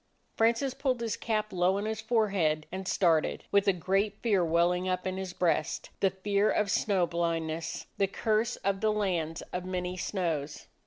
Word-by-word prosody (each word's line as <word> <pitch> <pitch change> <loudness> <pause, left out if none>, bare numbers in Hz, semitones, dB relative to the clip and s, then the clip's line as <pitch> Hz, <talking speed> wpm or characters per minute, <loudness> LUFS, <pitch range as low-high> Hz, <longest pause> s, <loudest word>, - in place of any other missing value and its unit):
Francis 235 +4 +2
pulled 260 -3 -1
his 230 -1 -2
cap 215 -3 -2
low 180 +2 +2
on 205 - -2
his 220 0 -3
forehead 195 -9 +1
and 190 0 -5
started, 165 -5 +2
with 200 0 +3
a - - +7
great 195 +3 0
fear 205 -6 +3
welling 175 +2 +2
up 185 0 -1
in 185 0 -2
his 190 -1 -4
breast; 175 -3 -1
the 195 - +3
fear 200 +2 +1
of 205 -2 +1
snow 195 -4 +2
blindness, 165 -1 -2
the 195 - +3
curse 220 +4 0
of 195 -1 0
the 215 -1 +3
lands 175 -6 -1
of 180 0 -2
many 180 0 -3
snows. 165 -6 -3
190 Hz, 175 wpm, -29 LUFS, 175-210 Hz, -, a